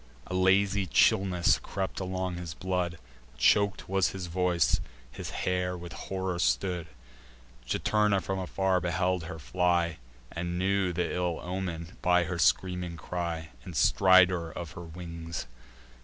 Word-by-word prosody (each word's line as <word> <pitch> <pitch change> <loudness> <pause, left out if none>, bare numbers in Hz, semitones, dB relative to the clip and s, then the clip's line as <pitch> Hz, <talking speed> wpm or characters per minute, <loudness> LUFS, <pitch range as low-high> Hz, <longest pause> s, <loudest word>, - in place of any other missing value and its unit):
A - - -7
lazy 95 +1 +3
chillness 90 +2 +3
crept 95 -1 -4
along 95 -1 -3
his 85 -2 -6
blood; 90 -2 -2 0.4
Chok'd 100 +9 +3
was 95 -1 +2
his 95 -2 -5
voice; 90 -1 +1 0.3
his - - -6
hair 90 0 -1
with 85 -2 -8
horror 95 -1 -3
stood. 90 0 0 0.8
Juturna 105 - +2
from 95 +2 -3
afar 95 0 0
beheld 90 0 0
her 80 - -6
fly, 85 +1 0 0.3
And 85 +1 -3
knew 95 0 +1
th' 85 - -8
ill 90 -2 -1
omen, 90 -2 -4
by 90 0 +4
her 85 0 -4
screaming 90 0 +1
cry 85 -2 -4
And 90 - -8
stridor 95 -2 +5
of 85 -2 -6
her - - -9
wings. 85 -1 -6
90 Hz, 135 wpm, -29 LUFS, 85-95 Hz, 0.8 s, stridor